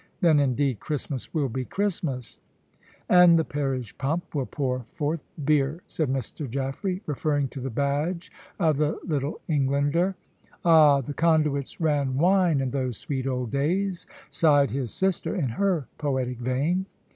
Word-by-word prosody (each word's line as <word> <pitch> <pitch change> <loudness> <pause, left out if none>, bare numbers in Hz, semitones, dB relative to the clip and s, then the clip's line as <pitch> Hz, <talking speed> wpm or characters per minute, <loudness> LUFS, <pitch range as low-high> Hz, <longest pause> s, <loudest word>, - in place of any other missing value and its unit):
Then, 165 -6 +4
indeed, 135 -3 +1
Christmas 145 -3 -4
will 150 -4 0
be 130 +2 -3
Christmas." 160 - -3 0.7
"And 180 -2 +7
the 160 - +1
parish 135 -4 -3
pump 160 +6 -2
will 140 -4 -1
pour 130 -3 -2
forth 150 +5 -3 0.2
beer," 150 +2 +1
said 155 -5 -2
Mr. 135 +2 -3
Jaffray, 140 - -3
referring 145 -1 0
to 135 - -8
the 130 +1 -4
badge 145 +7 -1 0.3
of 160 -5 +2
the 150 +1 0
Little 145 -3 -2
Englander. 145 +5 +1 0.5
"Ah, 155 -4 +6
the 145 +3 -6
conduits 150 -3 +1
ran 145 -5 +1
wine 175 -2 +3
in 130 -2 -2
those 130 -4 -2
sweet 135 -2 -3
old 125 -3 -2
days," 175 +7 -1 0.2
sighed 145 -4 +4
his 130 -4 -2
sister, 190 +1 -1
in 150 -10 0
her 175 - 0
poetic 130 -4 -1
vein. 145 +10 0
145 Hz, 145 wpm, -26 LUFS, 135-165 Hz, 0.7 s, And